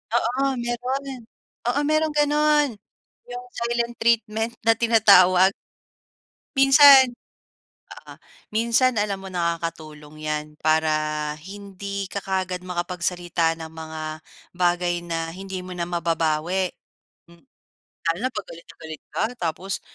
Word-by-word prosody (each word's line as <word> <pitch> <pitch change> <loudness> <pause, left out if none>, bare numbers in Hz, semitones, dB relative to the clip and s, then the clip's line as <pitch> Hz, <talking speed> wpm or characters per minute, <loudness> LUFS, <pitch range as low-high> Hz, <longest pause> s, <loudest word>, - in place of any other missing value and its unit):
Oo, 265 +3 +1
mayro'n. 255 +3 -3 0.5
Oo, 245 +4 +1
mayro'n 310 +1 +1
gano'n, 295 0 +3 0.6
yung 245 0 -7
silent 235 0 -2
treatment 225 0 +1
na 225 - +5
tinatawag. 195 -5 +6 1.0
Minsan, 270 -1 +8 0.7
oo, - - -12 0.4
minsan 235 +3 +3
alam 205 -1 -1
mo 190 - -7
nakakatulong 165 -3 -4
yan 150 0 -1 0.2
para 155 0 +2 0.5
hindi 200 +1 -6
ka 200 - -2
kaagad 185 -1 -2
makapagsalita 175 -2 -2
ng 160 -1 -8
mga 160 -1 -7 0.5
bagay 175 0 0
na 165 -1 -4
hindi 190 0 -6
mo 185 - -7
na 170 -1 -3
mababawi. 170 +1 0 0.6
M 170 - -19 0.6
Lalo 165 0 +1
na 255 - +1
pag 210 -2 -5
galit 170 - -12
na - - -13
galit 160 -1 -8
ka - - 0
tapos 180 +2 -3
190 Hz, 115 wpm, -23 LUFS, 170-235 Hz, 1.0 s, Minsan